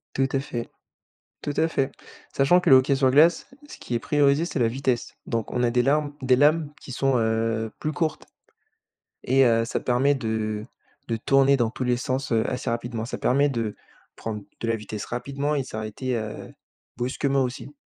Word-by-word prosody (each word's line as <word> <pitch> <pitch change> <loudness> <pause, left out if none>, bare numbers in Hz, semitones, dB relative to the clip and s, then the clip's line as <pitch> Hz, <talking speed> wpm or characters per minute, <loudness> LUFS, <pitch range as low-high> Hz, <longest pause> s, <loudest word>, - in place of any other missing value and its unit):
Tout 135 0 +2
à 135 - +2
fait, 120 -4 -5 0.7
tout 145 - -3
à 160 - +3
fait. 135 -3 0 0.4
Sachant 175 +7 +4
que - - -1
le 130 - +10
hockey 135 +2 +3
sur 130 -1 +3
glace, 155 +6 +4 0.2
ce - - -11
qui 120 - -5
est - - +2
priorisé, 145 +4 +2
c'est 160 - -3
la 115 -2 +3
vitesse. 130 -1 -2
Donc, 115 -2 -2
on 125 - 0
a 120 - +3
des 125 0 +2
larmes 145 +2 +1
des 130 -1 +4
lames 150 +2 +3
qui 130 - -9
sont, 135 0 +1
heu, 110 0 0
plus 155 0 -2
courtes 160 -2 -2 1.0
et, 135 +1 +4
heu, 115 -1 +3
ça - - -2
permet 130 +3 +2
de 110 -3 -2 0.4
de 115 -1 -1
tourner 135 +3 +4
dans 115 -2 +1
tous 130 - -4
les 125 -1 +1
sens, 130 +2 -3
heu, 110 -1 +2
assez 125 - -3
rapidement. 115 -1 -3
Ça - - -5
permet 140 +3 +2
de 115 -5 -2 0.4
prendre 105 -2 -5 0.2
de 115 - -2
la 115 - +2
vitesse 105 -1 -6
rapidement 140 +4 -2
et 140 - 0
s'arrêter, 110 +3 -4
heu, 110 -1 -6 0.4
brusquement, 135 +2 0
aussi. 130 +3 -5
130 Hz, 195 wpm, -25 LUFS, 115-140 Hz, 1.0 s, le